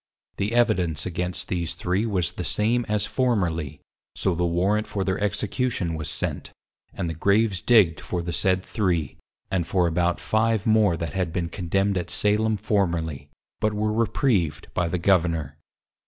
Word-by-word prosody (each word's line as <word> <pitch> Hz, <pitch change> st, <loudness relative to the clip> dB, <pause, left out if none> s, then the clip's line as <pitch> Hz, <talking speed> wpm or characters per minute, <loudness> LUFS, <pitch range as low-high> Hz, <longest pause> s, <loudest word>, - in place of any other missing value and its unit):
The 100 Hz, +3 st, -1 dB
Evidence 90 Hz, -11 st, +2 dB
against 90 Hz, 0 st, -2 dB
these 85 Hz, -3 st, -2 dB
three 95 Hz, +5 st, 0 dB
was 90 Hz, -7 st, 0 dB
the -, -, -5 dB
same 115 Hz, +3 st, 0 dB
as 105 Hz, -1 st, +1 dB
formerly, 85 Hz, -, -1 dB, 0.3 s
so 95 Hz, -, 0 dB
the 85 Hz, +1 st, -1 dB
Warrant 95 Hz, +6 st, +1 dB
for 100 Hz, -, -2 dB
their 95 Hz, 0 st, -1 dB
Execution 105 Hz, -2 st, -1 dB
was 80 Hz, -2 st, -4 dB
sent, 70 Hz, -, -3 dB, 0.4 s
and 85 Hz, -, -4 dB
the 80 Hz, -, -3 dB
Graves 100 Hz, +4 st, +2 dB
digged 90 Hz, -11 st, +4 dB
for 85 Hz, +3 st, -3 dB
the 85 Hz, 0 st, -4 dB
said 95 Hz, +2 st, +1 dB
three, 90 Hz, -, -1 dB, 0.3 s
and 90 Hz, -3 st, 0 dB
for 90 Hz, -2 st, +2 dB
about 85 Hz, +1 st, +1 dB
five 110 Hz, -1 st, +1 dB
more 110 Hz, -6 st, +3 dB
that 80 Hz, -2 st, -4 dB
had 95 Hz, -3 st, -1 dB
been 85 Hz, 0 st, -2 dB
Condemned 95 Hz, +2 st, 0 dB
at 90 Hz, 0 st, -6 dB
Salem 105 Hz, +1 st, +1 dB
formerly, 85 Hz, -9 st, -1 dB, 0.3 s
but 110 Hz, 0 st, +1 dB
were 105 Hz, +1 st, 0 dB
Repreived 105 Hz, -, 0 dB
by 90 Hz, -, 0 dB
the 85 Hz, +2 st, -1 dB
Governour. 85 Hz, -5 st, +1 dB
95 Hz, 165 wpm, -24 LUFS, 85-105 Hz, 0.4 s, digged